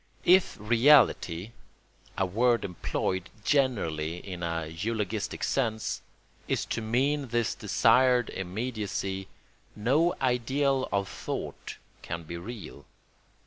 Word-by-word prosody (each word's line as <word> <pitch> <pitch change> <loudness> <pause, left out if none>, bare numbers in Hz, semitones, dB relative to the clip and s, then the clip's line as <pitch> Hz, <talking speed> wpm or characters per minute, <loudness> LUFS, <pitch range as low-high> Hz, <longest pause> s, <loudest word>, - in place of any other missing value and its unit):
If 185 +1 +5
reality 115 - +4 0.7
(a 95 - +2
word 115 +5 +2
employed 95 +1 -2
generally 85 - +1
in 90 -1 -7
a 85 -1 -2
eulogistic 105 +5 -3
sense) 110 -5 -1 0.5
is - - 0
to - - -3
mean 135 +6 +1
this 120 -1 0
desired 125 -2 +3
immediacy, 95 -1 -3 0.5
no 145 +11 +2
ideal 130 +2 +1
of 100 -1 0
thought - - -6 0.2
can 85 0 -5
be 85 +2 -7
real. 95 -1 -8
110 Hz, 100 wpm, -28 LUFS, 95-125 Hz, 0.7 s, If